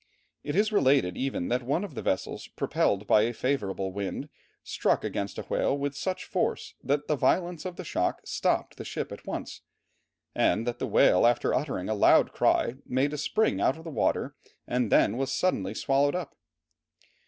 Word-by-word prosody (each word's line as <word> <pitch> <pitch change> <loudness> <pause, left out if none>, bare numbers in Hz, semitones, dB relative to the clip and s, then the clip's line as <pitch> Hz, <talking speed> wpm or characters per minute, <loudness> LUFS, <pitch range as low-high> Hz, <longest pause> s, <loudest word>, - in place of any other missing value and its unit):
It 145 - -3
is 210 +2 +2
related 135 - +3
even 130 -9 -2
that 125 +1 +1
one 140 +9 -1
of 205 - -7
the - - -5
vessels 95 - -2
propelled 100 +1 0
by 105 - +5
a 115 +3 0
favourable 100 -7 -2
wind, 100 0 -4 0.3
struck - - 0
against 100 0 -3
a - - -4
whale 140 - 0
with 140 0 -3
such 185 +5 -3
force - - -2
that 145 +1 0
the 150 - +2
violence 175 +5 0
of 180 -1 -5
the 185 - -7
shock 90 - -1
stopped - - -1
the - - -6
ship - - -5
at - - -10
once, - - -5 0.7
and 110 +6 +2
that 120 0 -3
the - - -2
whale 90 - +5
after 120 0 +1
uttering 130 -9 -2
a 110 - 0
loud 105 - +5
cry, 120 - +1
made 135 +4 0
a - - -3
spring 220 +8 +1
out 135 - +2
of 160 - -12
the 165 - -7
water - - 0 0.3
and 125 -3 -1
then 110 - +4
was 135 0 -1
suddenly 135 - 0
swallowed 140 +3 +2
up. 180 -6 -5
135 Hz, 190 wpm, -28 LUFS, 110-150 Hz, 0.7 s, by